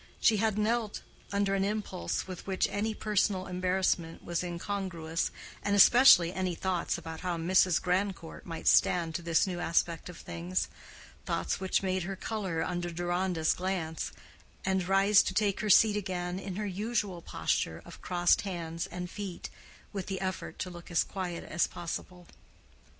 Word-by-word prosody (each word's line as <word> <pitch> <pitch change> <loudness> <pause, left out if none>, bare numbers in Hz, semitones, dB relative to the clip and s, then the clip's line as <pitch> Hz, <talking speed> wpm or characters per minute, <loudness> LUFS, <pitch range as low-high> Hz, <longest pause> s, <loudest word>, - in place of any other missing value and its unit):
She 220 - +4
had 215 0 +1
knelt 220 0 0 0.3
under 200 0 +1
an 195 -1 +1
impulse 200 - -2
with 185 0 -8
which 190 -1 +1
any 215 +2 -1
personal 205 -3 +1
embarrassment 180 -2 0
was 175 0 -2
incongruous, 175 -2 -3 0.3
and 200 0 +1
especially 200 -5 +8
any 185 -2 -1
thoughts 180 -1 -1
about 160 -1 -7
how 180 -2 -2
Mrs. 180 +1 +3
Grandcourt 180 -2 -2
might 165 -2 -6
stand 170 -2 +4
to 175 - -3
this 170 +1 +2
new 180 -2 -4
aspect 170 0 0
of 180 - -9
things—thoughts 85 0 -4
which 190 +1 0
made 185 0 0
her 190 +3 -4
color 190 -6 -2
under 175 0 -2
Deronda's 175 -1 0
glance, 180 -4 -3 0.5
and 190 -1 +1
rise 195 +1 +5
to 190 - -3
take 205 -2 +2
her 215 - -2
seat 210 +1 +6
again 180 -2 -3
in 195 -2 -6
her 210 +2 -2
usual 205 -2 -2
posture 80 - -1
of 170 - -12
crossed 175 -1 +3
hands 170 -2 -4
and 180 -1 -5
feet, 190 -1 -6 0.4
with 195 -3 -4
the 190 -2 -3
effort 190 -2 -4
to 180 - -4
look 175 -1 -11
as 170 - +3
quiet 180 -3 -5
as 170 - +1
possible. 175 +1 -6
185 Hz, 160 wpm, -30 LUFS, 170-195 Hz, 0.5 s, especially